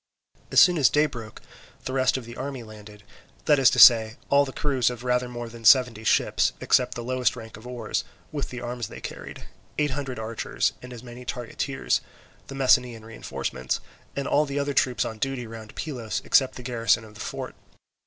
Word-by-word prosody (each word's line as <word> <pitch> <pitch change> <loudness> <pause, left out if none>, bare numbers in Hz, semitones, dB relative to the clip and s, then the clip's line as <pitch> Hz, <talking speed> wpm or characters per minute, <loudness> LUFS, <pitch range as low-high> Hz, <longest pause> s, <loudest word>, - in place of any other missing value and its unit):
As - - +6
soon 180 -4 +6
as 130 -6 +6
day 150 +8 +3
broke, 115 -7 -8 0.4
the 130 - -3
rest 130 0 +2
of 130 - -7
the 120 +1 -10
army 135 -2 -5
landed, 105 -1 -13 0.4
that 150 -2 +4
is 130 - +7
to 125 - -1
say, 110 -2 +8
all 140 0 +5
the 135 - -7
crews 130 -4 +1
of 120 -1 -7
rather 125 0 0
more 120 -1 -6
than 115 0 -12
seventy 120 -2 +5
ships, - - +2
except 125 -1 +2
the 120 - -5
lowest 130 +1 0
rank 115 -2 -10
of 110 +3 -12
oars, 120 -4 -3 0.3
with 145 -2 -4
the 125 -1 -7
arms 120 -2 -4
they - - -10
carried, - - -8 0.3
eight 150 -2 +1
hundred 135 -1 -4
archers, 110 +1 -2
and 125 - -10
as 120 -1 -9
many 120 0 -10
targeteers, 125 +2 -2 0.5
the 135 - -8
Messenian 125 -4 +2
reinforcements, 65 - -4 0.4
and 140 0 -2
all 150 +1 +2
the 140 +1 -4
other 145 0 -1
troops 125 -2 +1
on 110 -1 -6
duty 135 0 -2
round 110 -1 -10
Pylos, 125 -8 -4
except 130 -2 +3
the 125 - -9
garrison 115 -2 +1
on 105 - -14
the - - -14
fort. - - -5
125 Hz, 200 wpm, -25 LUFS, 115-135 Hz, 0.5 s, say